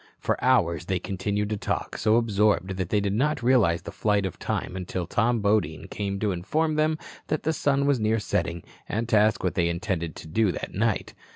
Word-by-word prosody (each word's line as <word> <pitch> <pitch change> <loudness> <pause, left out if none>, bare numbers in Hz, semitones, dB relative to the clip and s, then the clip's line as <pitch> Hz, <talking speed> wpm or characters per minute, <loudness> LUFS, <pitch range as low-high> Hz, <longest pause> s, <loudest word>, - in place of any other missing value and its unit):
For - - -2
hours 90 - +2
they 95 - +1
continued 100 +3 -2
to 105 - 0
talk, - - -3
so 110 0 +2
absorbed 105 -5 +2
that 95 -2 -2
they 105 - +2
did 100 -1 -1
not 135 +3 0
realize 115 -10 +3
the - - -7
flight 105 -2 +1
of 95 - -5
time 90 - -3
until 90 -1 -3
Tom 115 +6 +1
Bodine 100 -7 +1
came 100 -1 -3
to 105 -2 +1
inform 155 - 0
them 155 +1 +1 0.3
the 155 +1 0
sun 140 -2 +1
was 140 -3 +2
near 110 +1 +2
setting 85 -5 -2 0.3
and 110 +2 -1
to 110 - +3
ask 105 +1 +3
what 90 - 0
they 85 -1 +1
intended 85 -2 -2
to - - -9
do 100 +5 +2
that - - -6
night. - - 0
105 Hz, 205 wpm, -26 LUFS, 90-115 Hz, 0.3 s, realize